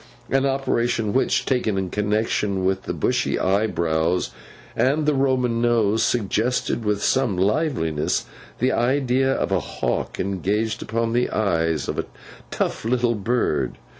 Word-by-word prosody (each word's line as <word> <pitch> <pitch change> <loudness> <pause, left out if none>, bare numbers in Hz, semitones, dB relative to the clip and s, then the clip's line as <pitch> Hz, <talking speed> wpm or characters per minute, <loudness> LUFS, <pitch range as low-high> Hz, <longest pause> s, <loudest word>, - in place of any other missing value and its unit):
An 135 +1 +3
operation 120 -5 0
which, 130 - +1
taken 120 -6 0
in 95 -2 -2
connexion 105 -2 0
with 95 0 0
the - - -2
bushy - - 0
eyebrows 90 -4 +1 0.4
and 145 +4 +2
the 150 - +3
Roman 130 -4 +1
nose, 115 -2 +2
suggested 115 +1 0
with 105 -1 0
some 130 -8 +1
liveliness 95 - 0 0.3
the 130 +2 +1
idea 130 +1 +2
of 135 - -1
a 95 - +3
hawk - - -3
engaged 100 +4 -1
upon 115 0 -1
the 120 +1 +1
eyes 80 -7 0
of - - -3
a - - -1 0.4
tough - - -2
little 120 +1 +1
bird. 100 - -1
110 Hz, 135 wpm, -23 LUFS, 95-125 Hz, 0.4 s, An